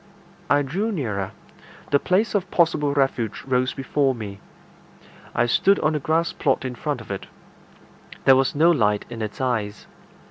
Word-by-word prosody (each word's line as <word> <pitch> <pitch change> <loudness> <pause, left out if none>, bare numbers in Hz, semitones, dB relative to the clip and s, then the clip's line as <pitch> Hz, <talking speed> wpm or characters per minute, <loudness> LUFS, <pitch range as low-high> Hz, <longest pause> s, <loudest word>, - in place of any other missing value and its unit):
I 145 0 +4
drew 190 +11 -2
nearer. 105 - -3 0.6
The 140 - +5
place 195 +9 +1
of 195 -3 0
possible 160 -4 +2
refuge 135 -6 0
rose 130 -1 0
before 135 0 0
me. 100 -4 -7 1.0
I - - +3
stood 195 +11 +3
on 155 - +2
the 150 - 0
grass 165 +3 0
plot 135 -2 0
in 130 - -3
front 120 - -3
of - - -9
it. - - -5 1.0
There 135 - +8
was 135 +1 +1
no 165 +4 +5
light 105 -9 +1
in 115 -1 -6
its 105 -1 -5
eyes. 110 -6 -2
135 Hz, 165 wpm, -23 LUFS, 115-160 Hz, 1.0 s, There